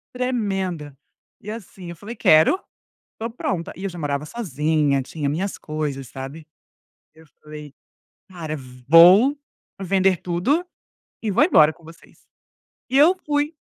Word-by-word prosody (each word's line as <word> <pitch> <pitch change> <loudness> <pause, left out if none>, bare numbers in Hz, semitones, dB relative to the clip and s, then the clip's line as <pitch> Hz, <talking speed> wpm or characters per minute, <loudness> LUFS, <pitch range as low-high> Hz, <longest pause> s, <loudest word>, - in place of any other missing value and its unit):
Tremenda. 195 - -2 0.5
E 210 - -9
assim, 195 -5 -9
eu 170 - -8
falei: 215 +8 -9
"Quero. 160 - +4 0.5
Estou 225 +1 -5
pronta", 190 -7 -4
e 190 - -10
eu 195 - -2
já 175 - -10
morava 145 -1 -2
sozinha, 150 - 0
tinha 145 +2 -5
minhas 185 +7 -2
coisas, 150 -4 -4
sabe. 135 +5 -9 0.7
Eu 160 0 -18 0.2
falei: 150 -2 -11 0.6
"Cara, 160 -4 -6 0.3
vou 185 - +7 0.5
vender 190 -1 +2
tudo 190 - 0 0.6
e 220 - -2
vou - - +3
embora 155 -3 +5
com 170 - -24
vocês". 165 +1 -17 0.7
E 265 - +1
eu 320 +6 +6
fui. 295 +1 -1
175 Hz, 135 wpm, -22 LUFS, 150-215 Hz, 0.7 s, vou